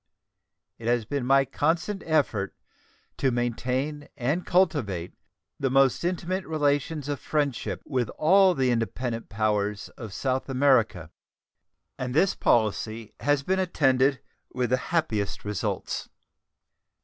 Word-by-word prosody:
It 115 - -6
has 120 -2 +2
been 140 0 -2
my 135 0 +5
constant 170 +9 -1
effort 130 -11 +1 0.6
to 135 - +2
maintain 125 +4 -2
and 145 +8 -1
cultivate 140 - +1 0.5
the 135 - +1
most 135 +1 +3
intimate 180 +2 -1
relations 145 -1 0
of 145 -1 -2
friendship 145 -5 -2
with 125 -5 -1
all 190 +3 +5
the 130 -1 +2
independent 115 0 -2
powers 105 -1 -1
of 115 -5 -9
South 130 +6 -2
America, 125 - +2 0.9
and 125 0 -3
this 190 +5 +4
policy 110 0 0
has 145 -1 +1
been 190 +5 +1
attended 135 -6 +2 0.4
with 125 -2 0
the 130 - +4
happiest 110 - -1
results. 105 -1 -3
130 Hz, 120 wpm, -26 LUFS, 115-150 Hz, 0.9 s, my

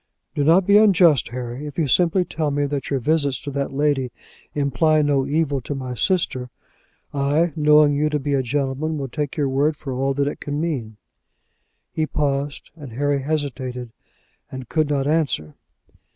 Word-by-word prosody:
"Do 145 -2 0
not 170 +5 +5
be 200 +2 +6
unjust, 180 - +5
Harry. 125 +3 -6
If 145 - -9
you 165 - +2
simply 175 - +2
tell 155 -3 -2
me 145 0 0
that 140 -1 -3
your 140 - 0
visits 145 0 +1
to 145 - -6
that 140 0 -2
lady 135 -2 0 0.4
imply 150 +2 +2
no 140 -2 +1
evil 145 -2 0
to 145 - -5
my 130 -2 -5
sister, 130 - -1 0.6
I, 145 +4 +1
knowing 150 -1 +5
you 150 +2 +1
to 150 - 0
be 145 0 -2
a 135 - +2
gentleman, 140 +4 -2
will 135 -2 -4
take 150 +2 -4
your 145 -2 +1
word 140 +3 +1
for 135 -3 -6
all 135 +2 -1
that 140 0 +1
it 145 - -4
can 145 0 -4
mean." 130 -10 -3 0.9
He 155 -1 -1
paused, 140 -1 -2
and 145 -7 -10
Harry 140 +2 0
hesitated 130 -5 -3 0.6
and 130 -2 -7
could 155 +1 0
not 140 -2 0
answer. 145 - 0
145 Hz, 180 wpm, -22 LUFS, 135-155 Hz, 0.9 s, be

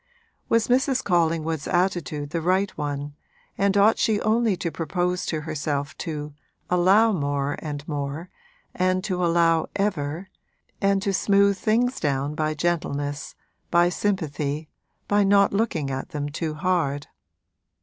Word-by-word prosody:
Was 230 -1 +3
Mrs. 265 +1 +2
Collingwood's 165 -3 0
attitude 170 -5 -1
the 165 - -1
right 185 +4 +1
one 145 -1 -4 0.4
and 200 0 +2
ought 210 +2 +5
she 215 -2 +2
only 220 -2 +2
to 170 -1 -3
propose 180 +3 -2
to 155 -2 -2
herself 150 -2 -3
to 150 -2 -5 0.4
'allow' 190 +6 +5
more 145 -3 -1
and 145 -2 -6
more, 145 +2 -4 0.5
and 185 0 +1
to 185 -3 -1
allow 165 -1 +3
ever, 180 -3 -2 0.5
and 195 -1 +2
to 200 -2 0
smooth 200 +1 +3
things 240 +6 +1
down 140 -1 -1
by 155 0 -1
gentleness, 145 -3 -2 0.3
by 175 +1 +4
sympathy, 155 -6 -2 0.4
by 205 0 +3
not 200 0 +4
looking 175 -10 0
at 130 0 -4
them 145 -1 -3
too 155 +1 -3
hard? 150 -4 0
170 Hz, 135 wpm, -24 LUFS, 150-195 Hz, 0.5 s, ought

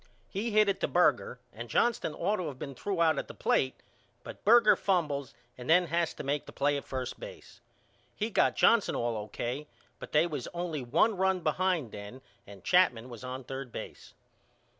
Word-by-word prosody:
He 210 +4 -2
hit 215 -1 +4
it 200 - 0
to - - +1
Berger 175 -7 +2
and 120 +2 -8
Johnston 210 - +1
ought 210 +1 0
to 180 - -3
of 140 -4 -6
been 140 +1 -6
threw 175 +6 -1
out 160 -1 +3
at - - -5
the - - -10
plate 130 -1 +1 0.5
but - - -10
Berger 230 0 +6
fumbles 150 -8 -1 0.2
and 125 - -8
then 180 +2 +6
has 170 +1 -1
to - - -6
make 145 +1 -2
the - - -9
play 145 +1 +1
at 140 - -5
first 130 -1 -4
base. - - -11 0.5
He 215 +2 -2
got - - +3
Jackson 230 -3 +4
all 120 -1 -1
O.K. 120 +7 -4 0.3
but - - -9
they 155 +2 +4
was 150 -7 -4
only 170 -4 -3
one 160 - +2
run 190 -1 +1
behind 165 - 0
then 105 +6 -9 0.2
and 100 -1 -13
Chapman 130 -10 +3
was 120 -1 -10
on 130 +1 -6
third 135 0 -7
base. - - -9
150 Hz, 195 wpm, -30 LUFS, 130-185 Hz, 0.5 s, Berger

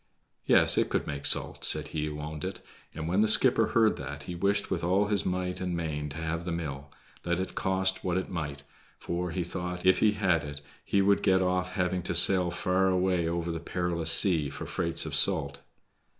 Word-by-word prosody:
"Yes, - - +4
it - - 0
could - - -2
make 70 0 -3
salt," - - 0
said - - 0
he 75 -1 -3
who 75 0 -6
owned 75 0 -7
it, 95 0 -5 0.4
and 80 0 -5
when 95 +5 +1
the 110 - +3
skipper 115 0 +6
heard 110 -2 +2
that 70 +1 -8
he 90 - -7
wished 100 +3 -1
with - - -2
all 95 +4 +1
his 100 -4 -1
might 90 0 -3
and 90 -2 -3
main 75 -3 -4
to 70 - -9
have 80 +1 -4
the 90 - -5
mill, 75 -4 -6 0.3
let 85 0 -2
it 95 - -5
cost 95 0 0
what 90 -1 -1
it 95 - -3
might, 75 -5 -6 0.3
for, 90 +1 -4
he 90 +1 -3
thought, 90 +1 -6
if 95 - +4
he 105 -1 +3
had 95 -6 0
it 70 0 -8 0.2
he 100 -1 +1
would 100 +1 +2
get 95 0 +2
off 90 0 -2
having 90 0 -1
to 90 - -4
sail 90 +1 +6
far 90 +2 0
away 90 -2 0
over 85 0 -3
the 80 - -5
perilous 85 -1 -1
sea 80 -8 +4
for - - -8
freights 85 -1 -1
of - - -6
salt. 70 0 +4
90 Hz, 215 wpm, -28 LUFS, 80-95 Hz, 0.4 s, skipper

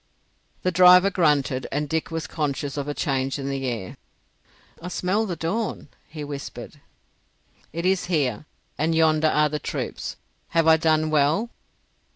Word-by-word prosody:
The 185 - +1
driver 180 +2 +7
grunted, 145 -7 +1
and 150 +1 -1
Dick 160 +2 -2
was 165 -1 -4
conscious 145 -2 -3
of 145 -1 -3
a 145 - -2
change 135 -1 -1
in 135 -1 -5
the 135 -1 -3
air. 110 -7 -5 0.8
"I 170 - -6
smell 190 +4 0
the 180 - -3
dawn," 185 +1 -3 0.2
he 155 -1 -7
whispered. 140 -1 -8 0.9
"It 170 +3 -4
is 190 0 +2
here, 150 - -1 0.3
and 160 +2 +1
yonder 160 -1 +3
are 150 0 +3
the 150 +1 -3
troops. - - -4 0.3
Have 165 -1 +1
I 160 0 +6
done 155 -1 +1
well?" 155 +10 +2
155 Hz, 155 wpm, -24 LUFS, 145-170 Hz, 0.9 s, driver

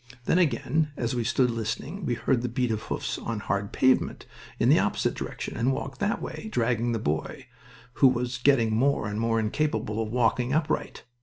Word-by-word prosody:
Then 180 - +3
again, 155 -2 +1
as 120 0 -1
we 120 -1 0
stood 125 +2 +2
listening, 115 - -4
we 120 - +1
heard 120 +2 +1
the 125 - -2
beat 125 0 0
of 110 -1 -1
hoofs - - -3
on 115 -2 -3
hard 100 0 -2
pavements, 130 0 +2 0.3
in - - +3
the - - +6
opposite - - 0
direction, - - -5
and 120 +4 +1
walked 135 0 -4
that 205 +2 0
way, 220 - -6
dragging 120 - +1
the - - 0
boy, 80 - -3 0.6
who 135 - +9
was 125 0 0
getting 120 -5 +3
more 130 -2 +2
and 105 +2 -3
more 115 0 +1
incapable 110 -2 -1
of 110 - -3
walking 125 +1 +1
upright. 155 0 -1
120 Hz, 190 wpm, -27 LUFS, 115-135 Hz, 0.6 s, who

